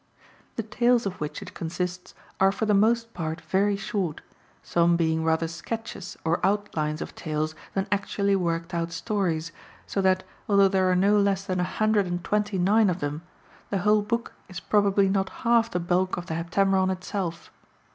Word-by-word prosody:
The 230 - -2
tales 240 +2 +2
of 190 -4 -4
which 150 - -4
it - - -11
consists 180 +2 -4 0.2
are 195 0 +5
for 220 - -2
the 210 - +2
most 230 +3 +2
part 160 -1 -3
very 200 +4 +1
short, 195 -5 -3 0.4
some 170 0 +3
being 160 -1 +1
rather 160 0 +1
sketches 190 +3 -6
or 165 +2 0
outlines 170 -6 0
of - - -10
tales 155 0 -2 0.2
than 195 +1 0
actually 200 0 +1
worked 170 -1 -1
out 170 0 -1
stories, 165 -3 -1 0.3
so 195 - -1
that, 185 0 +2 0.3
although 200 -1 +5
there 190 -1 +2
are 180 - +3
no 200 +3 +4
less 200 -1 +1
than 185 -1 -1
a - - +2
hundred 215 +1 +1
and 175 0 -3
twenty 210 -1 0
nine 200 +3 +4
of 180 0 -1
them, 145 0 -3 0.5
the 200 - 0
whole 210 +3 +3
book 230 +3 -2 0.2
is 185 -1 -6
probably 200 -1 +3
not 190 0 +1 0.2
half 230 -1 +4
the 180 - -1
bulk 180 +2 0
of 175 - -5
the 165 - -4
Heptameron 190 +3 +1
itself. 185 -2 -4
190 Hz, 180 wpm, -26 LUFS, 170-205 Hz, 0.5 s, are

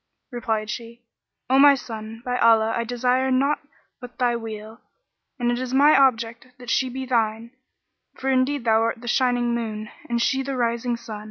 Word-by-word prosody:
Replied 225 -3 -2
she, 235 +1 -8 0.4
"O 260 +2 +3
my 285 0 +8
son, 225 -2 -8
by 250 0 -1
Allah, 225 -1 +4
I 235 - -1
desire 250 +2 0
nought 275 +3 +2 0.4
but 245 -2 -11
thy 245 -1 +1
weal; 220 0 -8 0.6
and 240 -1 0
it 240 - -1
is 255 0 -3
my 290 +3 +6
object 235 -2 +2
that 245 -2 -6
she 260 - +1
be 260 +1 -5
thine, 230 -2 -1 0.6
for 265 - -6
indeed 260 +1 +1
thou 225 -1 +3
art 230 +1 -1
the 240 - -9
shining 245 -1 +1
moon, 215 -2 -4 0.2
and 235 0 0
she 265 +3 +1
the 270 0 -4
rising 235 0 -1
sun. 220 -3 -8
240 Hz, 180 wpm, -23 LUFS, 225-255 Hz, 0.6 s, my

